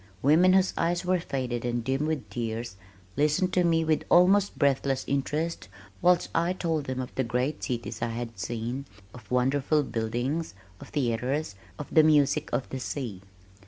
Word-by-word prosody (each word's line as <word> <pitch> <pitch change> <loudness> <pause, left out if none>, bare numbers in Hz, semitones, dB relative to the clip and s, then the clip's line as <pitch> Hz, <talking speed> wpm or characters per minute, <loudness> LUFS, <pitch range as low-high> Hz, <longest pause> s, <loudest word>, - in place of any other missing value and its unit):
Women 165 +7 +5
whose 190 0 +3
eyes 175 +1 0
were 180 0 +2
faded 125 -6 -3
and 120 -1 -1
dim 135 +4 0
with 150 -9 -2
tears, 115 -1 -4 0.4
listened 150 +6 +1
to 180 - +3
me 165 -1 +2
with 160 -1 +1
almost 195 +3 +4
breathless 135 -2 +1
interest 150 - -2 0.3
whilst 180 -1 +3
I 170 +2 +1
told 165 -5 -2
them 130 -1 -3
of 130 -1 -5
the 130 - 0
great 125 +5 -2
cities 120 -2 -4
I 115 - 0
had 115 -2 -6
seen, 120 +7 -4 0.3
of 125 - -13
wonderful 135 +4 +2
buildings, 120 +5 -2 0.2
of - - -11
theaters, 130 +1 -1 0.2
of 150 - -5
the 160 - +8
music 150 -1 +3
of 130 - -1
the 130 - -4
sea. 120 -8 -5
140 Hz, 165 wpm, -27 LUFS, 120-160 Hz, 0.4 s, the